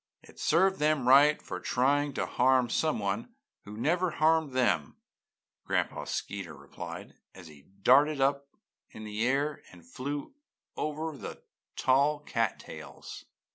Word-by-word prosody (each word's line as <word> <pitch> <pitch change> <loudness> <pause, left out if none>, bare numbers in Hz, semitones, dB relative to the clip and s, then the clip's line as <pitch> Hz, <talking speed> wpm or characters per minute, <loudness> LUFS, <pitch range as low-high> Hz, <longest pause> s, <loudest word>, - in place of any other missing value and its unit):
"It - - -17
served 190 +4 +2
them 150 -4 +1
right 145 +3 +6
for 90 - -7
trying 140 +5 +1
to - - -1
harm 125 -1 +2
someone 105 -11 -1 0.3
who 105 +1 -9
never 175 +9 +1
harmed 160 -2 +2
them!" 100 - +1 0.7
Gran'pa - - -1
Skeeterhawk 85 -8 -5
replied, - - -9 0.2
as 95 -2 -12
he 70 -2 -17 0.2
darted 145 +3 +5
up 140 +1 +1 0.4
in 110 - -10
the 105 +1 -3
air 140 +3 0
and 90 -2 -16
flew 140 - -5 0.4
over 155 +1 -3
the - - -9 0.3
tall 140 +3 +3
cat 115 -7 -1
tails. - - -10
135 Hz, 135 wpm, -29 LUFS, 110-150 Hz, 0.7 s, right